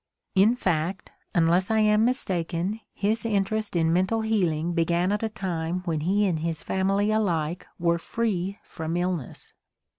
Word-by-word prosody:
In 210 +5 +5
fact, 180 -4 -1 0.2
unless 175 +3 +3
I 220 - +2
am 210 0 +4
mistaken, 185 -4 0
his 215 +3 0
interest 215 -1 -1
in 165 -1 +2
mental 190 +6 +1
healing 175 -7 0
began 170 +2 +1
at 210 - 0
a 225 - -1
time 180 -4 -3
when 165 -3 0
he 195 +7 +2
and 175 -5 0
his 165 0 -3
family 195 +2 +1
alike 175 -6 0
were 170 -1 +1
free 200 -1 -2
from 160 +1 -4
illness. 175 -6 -3
185 Hz, 150 wpm, -26 LUFS, 170-210 Hz, 0.2 s, In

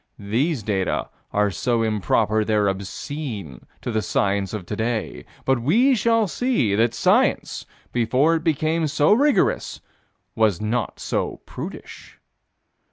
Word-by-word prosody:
These 120 +6 -1
data 95 -3 -1 0.2
are 105 0 +2
so 115 +5 0
improper 110 0 +1
they're 105 -1 +1
obscene 100 - -5
to 120 - -3
the 110 -1 0
science 100 0 0
of 105 -5 -5
today, 110 +3 -3 0.2
but 135 -2 +2
we 230 - +4
shall 230 -2 +2
see 225 - 0
that 115 +3 +2
science, - - +1 0.3
before 125 +7 +2
it 160 -1 -1
became 160 0 +1
so 150 +5 +3
rigorous, 285 +5 +2 0.5
was 110 -6 +2
not 110 +1 -2
so - - -2
prudish. - - -9
115 Hz, 125 wpm, -23 LUFS, 105-155 Hz, 0.5 s, we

